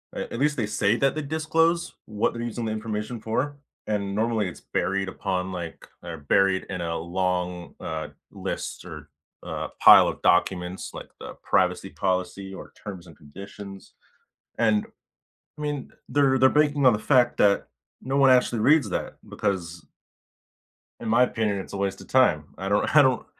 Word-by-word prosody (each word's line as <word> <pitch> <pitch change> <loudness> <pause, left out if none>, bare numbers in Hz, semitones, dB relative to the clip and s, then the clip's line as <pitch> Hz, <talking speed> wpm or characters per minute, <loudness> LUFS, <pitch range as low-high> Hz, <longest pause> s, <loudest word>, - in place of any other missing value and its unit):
at - - -5
at 115 - -4
least 150 0 +1
they 115 - 0
say 105 0 +1
that 135 +2 +1
they 155 - -2
disclose 160 +3 0
what 105 -1 -1
they're 115 - -5
using 120 0 -4
the 110 - -2
information 110 +1 -4
for, 130 +6 -2 0.3
and 100 -2 -2
normally 110 -1 0
it's 90 - -9
buried 95 0 -1
upon 95 -1 -3
like 85 -3 -7
they're 85 -2 -7
buried 95 +6 +2
in 90 -2 -4
a 85 -1 -2
long, 90 0 -2
uh, 80 -1 -5 0.2
list - - -5
or, - - -10 0.3
uh, - - -4
pile - - +9
of - - -4
documents 90 0 +1
like - - -9
the - - -8
privacy - - +1
policy 95 +1 -2
or - - -10
terms 95 -4 -8
and 80 - -14
conditions. 95 +5 -11 0.6
And, 110 -2 +2 0.7
I - - -6
mean, 145 -3 -3 0.2
they're 135 -2 +3
they're 130 +1 +6
banking 145 -2 +2
on 125 - +8
the 105 - 0
fact 120 +1 +3
that 100 -1 +3 0.4
no 135 +2 -2
one 135 -1 +6
actually 125 -2 +3
reads 140 0 +4
that - - -3
because 85 -4 -3 1.2
in 115 - -4
my 120 +3 +5
opinion, 110 -4 0
it's 95 - -7
a - - -3
waste 100 0 -2
of - - -13
time, 125 - +3 0.2
I 95 +1 -3
don't 105 +8 +1
I 150 - +9
don't 130 -2 +2
105 Hz, 175 wpm, -25 LUFS, 95-130 Hz, 1.2 s, pile